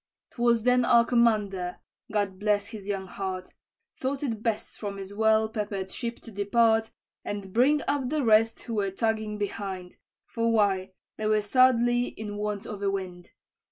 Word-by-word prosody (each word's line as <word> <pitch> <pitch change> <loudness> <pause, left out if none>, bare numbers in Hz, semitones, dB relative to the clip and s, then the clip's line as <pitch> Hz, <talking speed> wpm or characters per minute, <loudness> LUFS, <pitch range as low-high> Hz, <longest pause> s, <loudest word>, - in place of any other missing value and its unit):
"'Twas 235 -2 +2
then 250 0 +4
our 235 -1 +5
commander 210 -7 +1 0.3
God 200 -3 -1
bless 205 0 +1
his 210 -4 -9
young 195 -2 -2
heart 185 -1 -5 0.4
Thought 270 +2 -3
it 225 -6 -2
best 225 -2 -3
from 200 -2 -4
his 195 0 -7
well 220 +1 +3
peppered 205 -4 -4
ship 235 -1 -4
to 230 - -11
depart, 220 +2 +2 0.3
And 200 -2 -5
bring 285 +6 +4
up 280 -3 0
the 305 -1 0
rest 225 0 +3
who 235 - -6
were 205 -3 0
tugging 215 +1 -1
behind 195 -3 -5 0.3
For 230 0 0
why 195 -3 +1 0.2
they 215 - -1
were 215 -1 +2
sadly 245 +1 +4
in 210 -1 -6
want 210 -1 -3
of 205 -2 -7
a 200 - +1
wind. 185 -3 -5
215 Hz, 165 wpm, -27 LUFS, 200-235 Hz, 0.4 s, our